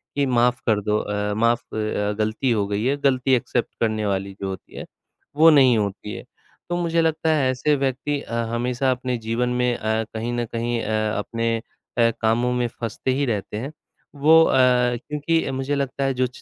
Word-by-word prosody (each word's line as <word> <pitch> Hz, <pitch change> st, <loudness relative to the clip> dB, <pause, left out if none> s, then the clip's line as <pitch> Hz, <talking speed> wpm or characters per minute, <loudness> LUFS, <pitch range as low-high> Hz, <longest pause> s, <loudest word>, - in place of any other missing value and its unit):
कि 140 Hz, 0 st, +2 dB
माफ़ 125 Hz, -1 st, +2 dB
कर 110 Hz, -2 st, +2 dB
दो 105 Hz, +1 st, 0 dB
अ, 105 Hz, 0 st, -2 dB
माफ़ 115 Hz, +2 st, +2 dB
अ, 105 Hz, -1 st, -1 dB
गलती 110 Hz, +4 st, 0 dB
हो 105 Hz, -3 st, +1 dB
गई 105 Hz, +2 st, -2 dB
है 140 Hz, +2 st, +1 dB
गलती 130 Hz, -1 st, +2 dB
एक्सेप्ट 120 Hz, 0 st, -2 dB
करने 110 Hz, -2 st, 0 dB
वाली 100 Hz, -1 st, -2 dB
जो 95 Hz, -, -2 dB
होती 95 Hz, -2 st, -9 dB
है, -, -, -6 dB, 0.5 s
वो 160 Hz, +2 st, +7 dB
नहीं 130 Hz, -6 st, +6 dB
होती 105 Hz, 0 st, -3 dB
है। -, -, -8 dB, 0.5 s
तो 175 Hz, -, -1 dB
मुझे 170 Hz, -1 st, +1 dB
लगता 160 Hz, 0 st, 0 dB
है 135 Hz, -4 st, +2 dB
ऐसे 145 Hz, +4 st, +1 dB
व्यक्ति 140 Hz, +1 st, -1 dB
अ, 115 Hz, -, -9 dB, 0.2 s
हमेशा 125 Hz, +2 st, -1 dB
अपने 125 Hz, 0 st, -2 dB
जीवन 115 Hz, +2 st, -1 dB
में 125 Hz, 0 st, +1 dB
अ, 110 Hz, +1 st, -1 dB
कहीं 115 Hz, +2 st, -3 dB
न 120 Hz, 0 st, -1 dB
कहीं 115 Hz, +1 st, -2 dB
अ, 110 Hz, 0 st, -1 dB
अपने 115 Hz, +2 st, -1 dB
अ, 115 Hz, +1 st, -2 dB
कामों 115 Hz, +3 st, +2 dB
में 125 Hz, -1 st, 0 dB
फँसते 115 Hz, +2 st, -4 dB
ही 140 Hz, +2 st, 0 dB
रहते 105 Hz, -3 st, -3 dB
हैं। 135 Hz, +7 st, -5 dB, 0.4 s
वो 160 Hz, +3 st, +6 dB
अ, -, -, +1 dB, 0.4 s
क्योंकि 150 Hz, +4 st, -1 dB
मुझे 135 Hz, +2 st, -2 dB
लगता 140 Hz, 0 st, -2 dB
है 135 Hz, 0 st, +1 dB
जो 130 Hz, 0 st, +1 dB
120 Hz, 195 wpm, -23 LUFS, 110-135 Hz, 0.5 s, वो